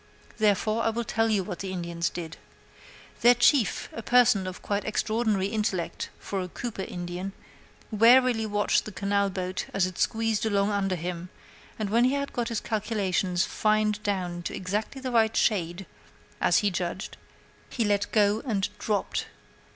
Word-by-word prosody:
Therefore, 215 +1 +2
I 225 - +2
will 235 +1 -2
tell 225 0 0
you 205 -3 +2
what 180 -2 -6
the 190 -1 -4
Indians 170 -2 -2
did. 165 -2 -7 0.8
Their 240 +1 +7
chief, 240 - +3
a 230 - -5
person 235 -5 +4
of 185 - -7
quite 205 0 -1
extraordinary 215 -2 0
intellect 210 -5 -2
for 195 -1 -4
a 180 - -4
Cooper 215 +2 -5
Indian, 180 +1 -5 0.6
warily 230 +1 +5
watched 205 0 +1
the 215 - -6
canal 200 +2 0
boat 185 -1 -4
as 195 -2 +3
it 185 -1 -6
squeezed 225 -1 +1
along 205 -2 +1
under 195 -2 0
him, 175 +1 -5 0.5
and 210 -2 -3
when 235 +2 +4
he 255 - +2
had 280 0 -3
got 240 -1 -1
his 230 -2 -2
calculations 195 -4 0
fined 215 -1 +1
down 185 -4 -2
to - - -5
exactly 205 +8 -3
the 260 -1 -3
right 225 -2 +3
shade, 180 -3 0 0.6
as - - +4
he 200 - +3
judged, 180 +2 -4 0.5
he 230 - -1
let 205 -1 +1
go 210 0 +3
and 210 -7 -1
dropped. 210 -2 -1
205 Hz, 165 wpm, -27 LUFS, 185-225 Hz, 0.8 s, Their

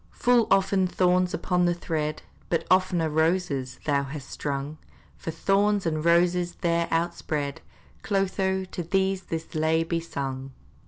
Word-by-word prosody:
Full 245 -2 +3
often 195 -1 +3
thorns 180 0 +2
upon 180 -1 +1
the 175 0 +2
thread, 155 -3 -3 0.3
But 165 -1 0
oftener 185 -3 +3
roses, 160 -4 0
thou 140 -2 +2
hast 140 0 -7
strung; 145 +1 -4 0.4
For - - -7
thorns 200 +4 +1
and 155 -2 -1
roses 175 +1 +3
there 170 -1 +1
outspread, 160 -4 -2 0.4
Clotho, 190 -1 0
to 185 - -6
thee 190 +2 +1
this 165 0 -4
lay 160 +1 +2
be 165 0 -1
sung! 135 -4 -5
170 Hz, 140 wpm, -26 LUFS, 155-185 Hz, 0.4 s, Full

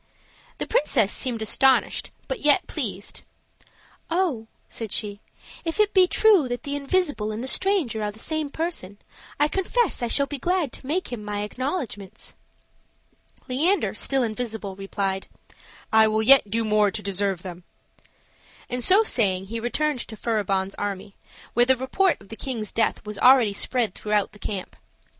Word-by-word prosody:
The - - -3
princess 235 -8 +2
seemed 235 -4 -2
astonished, 265 +4 +2 0.2
but - - -3
yet 295 -4 +4
pleased. - - -3 0.9
"Oh," 330 -11 0 0.2
said 225 -3 -5
she, 205 -2 -1 0.4
"if 330 +3 -4
it 420 -1 +3
be 370 -2 +6
true 400 -8 +4
that 245 -1 -4
the 285 0 -3
invisible 285 -6 0
and 215 +3 -5
the - - -4
stranger 315 - +2
are 210 - -1
the 210 - -11
same 310 +4 -3
person, 300 - -4 0.4
I 295 - +4
confess 385 - 0
I 240 - 0
shall 280 +4 +2
be 285 0 -6
glad 350 -3 0
to 260 - -10
make 330 -2 -2
him 220 -3 -5
my 205 0 -3
acknowledgments." 220 - -5 1.1
Leander, 315 +10 +1
still 270 -2 +1
invisible, 220 -3 -4
replied, 195 0 -3 0.7
"I 220 0 +7
will 220 0 +1
yet 260 -3 +7
do 225 +2 0
more 210 -1 +3
to 210 +1 -6
deserve 195 -2 -1
them;" 180 -2 -8 1.1
and 250 0 -2
so 390 - +6
saying 195 - +1
he 230 - -2
returned 280 +4 -1
to 220 - -9
Furibon's 200 -4 -1
army, 200 -1 -4 0.4
where 240 +1 +4
the 260 - +5
report 300 +9 +1
of 195 - -18
the 225 - -7
king's 225 -5 -4
death 225 - 0
was 210 -1 -6
already 250 -5 +6
spread 230 -1 -1
throughout 210 -1 0
the 210 - -17
camp. 195 -2 -5
235 Hz, 160 wpm, -24 LUFS, 210-290 Hz, 1.1 s, I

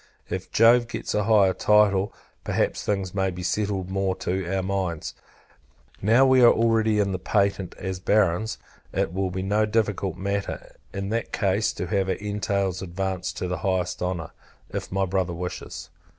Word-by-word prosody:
If - - -4
Jove 115 +1 +5
gets - - -4
a 105 -1 +1
higher 105 -4 +5
title, 105 -2 +3 0.3
perhaps - - 0
things 95 -3 -1
may 95 -1 +1
be 90 0 -6
settled 95 -1 -1
more 95 -1 0
to 95 -1 -3
our 95 -1 0
minds. 95 -4 -2 0.9
Now 115 +6 +5
we 130 -1 +5
are 120 - +8
already 115 -2 +2
in 100 -1 +1
the 95 - -2
patent, 100 -1 0
as 95 -1 -4
Barons; 105 +2 +1 0.3
it 85 - -1
will 95 0 -1
be 95 +1 -4
no 105 +2 +2
difficult 105 -5 0
matter, 100 +1 -4 0.2
in 100 +3 -4
that 115 +2 -2
case, 100 +1 +1
to - - -4
have 95 -2 0
our - - +1
entails 100 -2 -2
advanced 95 0 -3
to 90 - -2
the 90 -2 -3
highest 95 0 -1
honour, 90 -3 -3 0.4
if - - -5
my 95 0 +1
brother 95 -1 -1
wishes. 90 -1 -6
95 Hz, 170 wpm, -25 LUFS, 95-105 Hz, 0.9 s, are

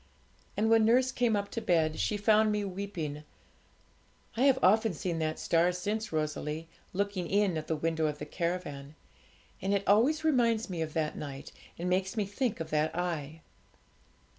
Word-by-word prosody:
And 215 +2 +2
when 225 -1 +6
nurse 250 +4 +4
came 240 -4 +1
up 200 0 -2
to 230 - -3
bed, 165 -7 +1
she 210 - 0
found 215 +1 +4
me 210 -1 -1
weeping. 180 -6 -5 1.1
I 250 +4 +2
have 270 -2 +5
often 215 +2 +4
seen 170 +1 -2
that 155 0 -1
star 170 +1 +2
since, 210 +5 -3
Rosalie, 155 0 -3 0.2
looking 195 -2 -2
in 200 -3 +2
at 155 -1 -4
the 160 - 0
window 160 0 0
of 150 -1 -3
the 150 - -6
caravan; 155 -4 -4 0.7
and 195 +2 +1
it 200 - 0
always 260 +10 +4
reminds 235 -8 +2
me 170 -2 -3
of 155 -1 -3
that 155 -2 -1
night, 140 -2 -7 0.3
and 175 - -3
makes 190 +4 0
me 210 - +1
think 205 +1 -2
of 165 - -5
that 155 +1 +1
Eye. 165 -3 -3
180 Hz, 175 wpm, -30 LUFS, 160-215 Hz, 1.1 s, when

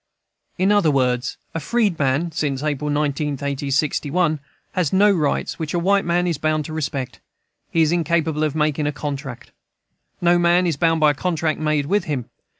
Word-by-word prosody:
In 190 +2 +2
other 205 -6 +4
words, 125 -2 0 0.2
a 165 - -2
freedman 170 - 0
(since 145 -4 -2
April 150 -1 -1
19, 145 0 0
1861) 145 +3 0 0.3
has 175 -6 0
no 205 +2 +5
rights 155 -7 -1
which 160 +1 -3
a - - +2
white 195 +3 +2
man 175 +1 +1
is 170 -5 -1
bound 155 -1 0
to 155 - -7
respect. 140 -4 -4 0.5
He 165 - +3
is 155 - +2
incapable 165 -2 0
of 155 -1 -1
making 150 -1 0
a - - 0
contract 140 -3 -6 0.7
No 175 0 +3
man 175 +1 +3
is 170 -4 +1
bound 165 +2 +1
by 150 -1 +6
a - - -2
contract 160 0 -1
made 155 -2 0
with 195 +4 +1
him. 135 -7 -3
155 Hz, 175 wpm, -21 LUFS, 145-170 Hz, 0.7 s, by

